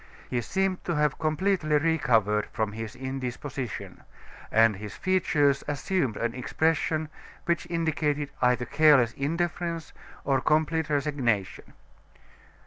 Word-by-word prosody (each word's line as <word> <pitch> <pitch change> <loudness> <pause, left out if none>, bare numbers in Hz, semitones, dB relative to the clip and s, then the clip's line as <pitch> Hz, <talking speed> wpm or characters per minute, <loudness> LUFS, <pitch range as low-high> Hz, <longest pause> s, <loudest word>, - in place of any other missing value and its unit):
He 120 - 0
seemed 190 +7 -1
to 170 - -1
have 150 -1 +1
completely 155 0 +1
recovered 120 -10 +2
from 110 -2 -1
his 110 0 -6
indisposition; 130 -1 -5 0.5
and 110 -2 +4
his 105 0 -8
features 150 -7 +2
assumed 145 - -1
an 115 0 -1
expression 155 +4 0 0.4
which 170 -1 0
indicated 155 -4 -1
either 125 -1 +2
careless 140 -5 +4
indifference, 170 +2 -2 0.3
or 135 -2 +1
complete 155 +2 +1
resignation. 140 -9 -1
145 Hz, 110 wpm, -27 LUFS, 125-160 Hz, 0.5 s, and